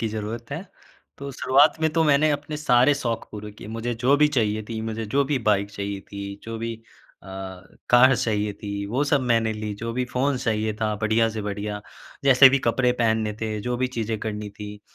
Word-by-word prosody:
की 115 - -1
ज़रूरत 110 +2 -5
है, 160 +6 -4 0.6
तो 140 0 -6
शुरुआत 145 +5 +3
में 160 - +3
तो 165 -1 +2
मैंने 150 +1 +4
अपने 145 +1 -3
सारे 135 -1 +4
शौक़ 115 -5 -3
पूरे 105 0 -7
किए, 105 - -11
मुझे 115 +2 -3
जो 140 +2 +5
भी 150 0 +4
चाहिए 110 -6 0
थी। 110 -1 -4
मुझे 110 0 -4
जो 140 - +4
भी 140 0 0
बाइक 100 0 +1
चाहिए 100 0 -5
थी, 100 0 -7
जो 115 0 -6
भी 115 0 -3 0.5
अ, - - -16 0.6
कार 125 +2 +7
चाहिए 105 -2 -1
थी, 100 0 -5
वो 125 +7 0
सब 145 -1 +2
मैंने 115 -3 +1
ली। 105 -1 -4
जो 115 +3 -5
भी 125 +1 -1
फ़ोन 135 +2 +1
चाहिए 110 -3 -1
था, 110 -1 0
बढ़िया 110 +2 +2
से 110 -1 -5
बढ़िया, 105 0 -4 0.4
जैसे 135 0 +8
भी 140 +1 +2
कपड़े 125 +1 +1
पहनने 110 -2 +1
थे, 110 -1 -2
जो 125 +2 -2
भी 130 +1 0
चीज़ें 110 -1 -2
करनी 105 -1 -4
थी, 105 0 -9
115 Hz, 210 wpm, -24 LUFS, 105-130 Hz, 0.6 s, जैसे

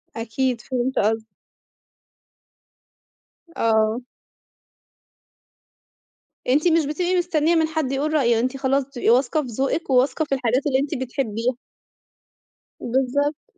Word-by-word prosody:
أكيد 235 +1 -2
فهمت 255 0 -2
قصدِك. 220 +1 +1 2.3
آه. 220 +1 +2 2.5
أنتِ 295 +7 +3
مش 325 -2 +3
بتبقي 350 +5 -1
مستنّية 340 -2 +1
من 320 -1 +3
حد 310 -4 -2
يقول 295 +3 -1
رأيه، 235 -6 +3
أنتِ 255 +3 -1
خلاص 270 +1 +1
بتبقي 255 -4 -2
واثقة 260 +5 +3
في 260 - -7
ذوقِك 270 +7 -2
وواثقة 260 +4 +2
في 275 - 0
الحاجات 255 +2 0
اللي 265 -1 +2
أنتِ 285 +1 -2
بتحبيها. 245 -2 -2 1.2
بالضبط. 270 +4 -1
265 Hz, 110 wpm, -22 LUFS, 240-295 Hz, 2.5 s, أنتِ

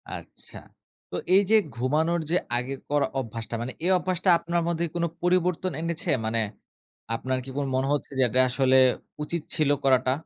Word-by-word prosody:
আচ্ছা। - - -10 0.5
তো - - -4 0.2
এইযে 200 +2 +4 0.2
ঘুমানোর 155 +8 +1
যে - - +3 0.2
আগের 130 +2 -4
করা 145 -1 +2
অভ্যাসটা 115 -1 -5
মানে 120 +2 -3
এই 185 - +3
অভ্যাসটা 185 +1 -1
আপনার 170 0 -1
মধ্যে 170 0 0
কোন 170 - 0 0.2
পরিবর্তন 180 0 +1
এনেছে? 165 0 -3 0.2
মানে 115 +1 0 0.8
আপনার 130 +2 -2
কি - - -8
কোন 145 - 0
মনে 130 +1 +1
হচ্ছে 145 - -3
যে - - +6
এটা 130 - +2
আসলে 130 0 +3 0.5
উচিত 170 +2 -3
ছিল 150 -2 +2
করাটা? 130 -1 +3
145 Hz, 165 wpm, -26 LUFS, 130-170 Hz, 0.8 s, যে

